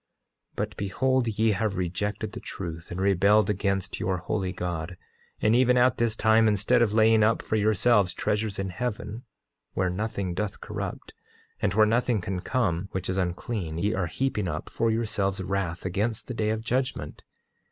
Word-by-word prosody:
8:25 -, -, -37 dB
But -, -, -3 dB
behold, 120 Hz, +6 st, +1 dB
ye 110 Hz, 0 st, +2 dB
have 100 Hz, 0 st, -1 dB
rejected 95 Hz, +3 st, -2 dB
the -, -, -7 dB
truth, 85 Hz, +1 st, -7 dB
and 85 Hz, -, -5 dB
rebelled 100 Hz, +2 st, +4 dB
against 100 Hz, -1 st, -1 dB
your 95 Hz, 0 st, 0 dB
holy 95 Hz, +1 st, -2 dB
God; 90 Hz, -1 st, -4 dB, 0.4 s
and 110 Hz, +2 st, +3 dB
even 125 Hz, 0 st, +4 dB
at 125 Hz, 0 st, +3 dB
this 115 Hz, -2 st, +1 dB
time, 110 Hz, 0 st, +4 dB
instead 110 Hz, +4 st, +3 dB
of 110 Hz, -2 st, +2 dB
laying 110 Hz, 0 st, +5 dB
up 110 Hz, +1 st, +3 dB
for -, -, -1 dB
yourselves 105 Hz, -2 st, +3 dB
treasures 105 Hz, -1 st, -1 dB
in 95 Hz, 0 st, -2 dB
heaven, 115 Hz, +2 st, -4 dB, 0.5 s
where 95 Hz, -1 st, 0 dB
nothing 100 Hz, -2 st, -2 dB
doth 105 Hz, +2 st, -3 dB
corrupt, -, -, -6 dB, 0.5 s
and 100 Hz, -2 st, +1 dB
where 110 Hz, 0 st, +6 dB
nothing 115 Hz, +1 st, +2 dB
can 90 Hz, 0 st, -3 dB
come 95 Hz, -4 st, -1 dB
which 95 Hz, -, -3 dB
is 95 Hz, -, -1 dB
unclean, 90 Hz, -1 st, -3 dB
ye 105 Hz, +5 st, 0 dB
are 95 Hz, -5 st, -1 dB
heaping 105 Hz, +1 st, -1 dB
up 75 Hz, -2 st, -4 dB
for 115 Hz, -, +1 dB
yourselves 105 Hz, -4 st, 0 dB
wrath 95 Hz, -3 st, -2 dB
against 105 Hz, +5 st, -1 dB
the 125 Hz, -, -5 dB
day 110 Hz, -2 st, 0 dB
of 110 Hz, 0 st, -1 dB
judgment. 125 Hz, +2 st, -2 dB
105 Hz, 175 wpm, -27 LUFS, 95-110 Hz, 0.5 s, where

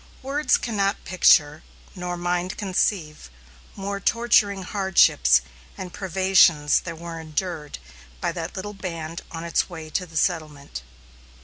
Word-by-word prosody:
Words 275 Hz, 0 st, +2 dB
cannot 200 Hz, -3 st, -1 dB
picture, 155 Hz, -4 st, +4 dB, 0.3 s
nor 180 Hz, -2 st, -5 dB
mind 175 Hz, +1 st, -2 dB
conceive, 180 Hz, -, -1 dB, 0.5 s
more 200 Hz, +1 st, -4 dB
torturing 205 Hz, -3 st, +2 dB
hardships 180 Hz, -, +4 dB, 0.4 s
and 180 Hz, -2 st, -7 dB
privations 185 Hz, -5 st, +3 dB
than 170 Hz, -2 st, -7 dB
were 165 Hz, 0 st, -7 dB
endured 160 Hz, -1 st, -4 dB, 0.4 s
by -, -, -1 dB
that 165 Hz, -1 st, -6 dB
little 205 Hz, +2 st, -5 dB
band 165 Hz, -4 st, -6 dB
on 165 Hz, 0 st, -7 dB
its 170 Hz, +2 st, 0 dB
way 160 Hz, -3 st, -9 dB
to 180 Hz, +2 st, -2 dB
the 160 Hz, -1 st, -7 dB
settlement. 155 Hz, -, -2 dB
175 Hz, 125 wpm, -24 LUFS, 160-195 Hz, 0.5 s, picture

